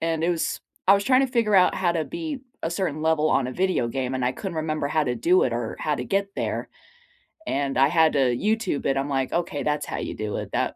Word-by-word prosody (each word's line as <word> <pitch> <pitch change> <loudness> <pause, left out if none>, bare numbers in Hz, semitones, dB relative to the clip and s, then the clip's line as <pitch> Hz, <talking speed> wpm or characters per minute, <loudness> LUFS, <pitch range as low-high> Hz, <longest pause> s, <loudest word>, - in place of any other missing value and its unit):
and 165 0 -1
it 175 - +2
was 170 -2 -1 0.3
I 195 - +9
was 200 0 0
tryna 260 +2 +4
figure 230 -4 +1
out 185 -1 +5
how 175 -2 +1
to 160 -2 -1
beat 320 - -5 0.2
a 165 - -1
certain 170 -5 -2
level 160 -1 +2
on 135 - +2
a 130 - -5
video 185 -6 +1
game 130 +1 -2
and 130 - -1
I 125 - +1
couldn't 170 +4 -6
remember 155 -2 -1
how 155 +1 +1
to 125 -2 -1
do 175 +11 +3
it 120 - -1
or 115 -1 -3
how 150 - 0
to - - -4
get 195 0 -1
there, - - -2 0.8
and 140 0 -1
I 135 +1 +6
had 160 -1 +4
to 140 - +2 0.2
YouTube 215 - -1
it. 135 - +2
I'm 140 +1 -1
like, 135 -1 -1
"Okay, 165 -5 -1
that's 150 0 -1
how - - -4
you - - -4
do 105 -1 -3
it," - - -6
that - - 0
160 Hz, 255 wpm, -24 LUFS, 135-190 Hz, 0.8 s, I